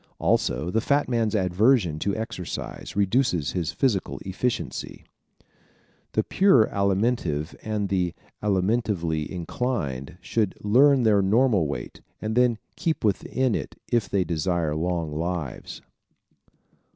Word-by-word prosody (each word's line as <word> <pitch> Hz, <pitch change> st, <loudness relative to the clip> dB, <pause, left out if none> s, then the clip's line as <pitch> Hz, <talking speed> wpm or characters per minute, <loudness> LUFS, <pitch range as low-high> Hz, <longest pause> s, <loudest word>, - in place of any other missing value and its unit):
Also, 85 Hz, +3 st, +1 dB
the 115 Hz, -, +1 dB
fat 145 Hz, +4 st, +2 dB
man's 115 Hz, -3 st, 0 dB
aversion 95 Hz, -, +2 dB
to 100 Hz, +3 st, -1 dB
exercise 110 Hz, -5 st, -5 dB
reduces 100 Hz, -, +1 dB
his 85 Hz, -4 st, -2 dB
physical 120 Hz, -9 st, 0 dB
efficiency. 115 Hz, +6 st, -3 dB, 1.1 s
The -, -, +2 dB
pure 185 Hz, -, +4 dB
Alimentive 100 Hz, -6 st, 0 dB
and 105 Hz, -2 st, -2 dB
the 90 Hz, -3 st, 0 dB, 0.3 s
alimentively 95 Hz, -6 st, 0 dB
inclined 85 Hz, -, -3 dB
should 105 Hz, +2 st, -1 dB
learn 130 Hz, +5 st, +5 dB
their 105 Hz, -3 st, +4 dB
normal 105 Hz, -, +3 dB
weight 65 Hz, -4 st, -6 dB, 0.2 s
and 110 Hz, +1 st, -3 dB
then 125 Hz, -2 st, +3 dB, 0.2 s
keep 160 Hz, -2 st, -1 dB
within 115 Hz, +4 st, +1 dB
it -, -, -4 dB, 0.2 s
if 120 Hz, -3 st, +1 dB
they 95 Hz, -2 st, +2 dB
desire 85 Hz, -1 st, -1 dB
long 85 Hz, -1 st, -1 dB
lives. 80 Hz, -3 st, -4 dB
100 Hz, 115 wpm, -25 LUFS, 85-115 Hz, 1.1 s, learn